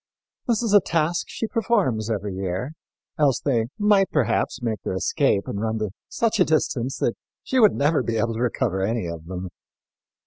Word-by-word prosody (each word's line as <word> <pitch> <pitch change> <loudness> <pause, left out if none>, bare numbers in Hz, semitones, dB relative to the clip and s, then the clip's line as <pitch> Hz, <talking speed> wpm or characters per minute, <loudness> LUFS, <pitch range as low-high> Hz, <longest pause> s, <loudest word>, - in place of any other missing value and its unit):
This 235 -1 +1
is 220 -3 0
a 205 - +9
task 165 +1 0
she - - -3
performs 200 - 0
every 105 -3 -2
year, 95 +7 -3 0.5
else 140 -5 +3
they 115 -5 0
might, 205 -2 +4
perhaps, 125 -2 0
make 115 -4 -3
their - - -3
escape 100 0 +1
and 100 - -3
run 110 0 -1
to 105 -3 -2 0.2
such 225 -2 0
a - - +7
distance 135 -6 0
that 120 - 0 0.3
she 260 - 0
would 215 -4 +6
never 145 +2 +2
be 115 -1 -2
able 115 +1 0
to 110 - -5
recover 100 -5 0
any 110 +1 -1
of 85 -1 -7
them. 90 0 -5
120 Hz, 185 wpm, -24 LUFS, 105-175 Hz, 0.5 s, a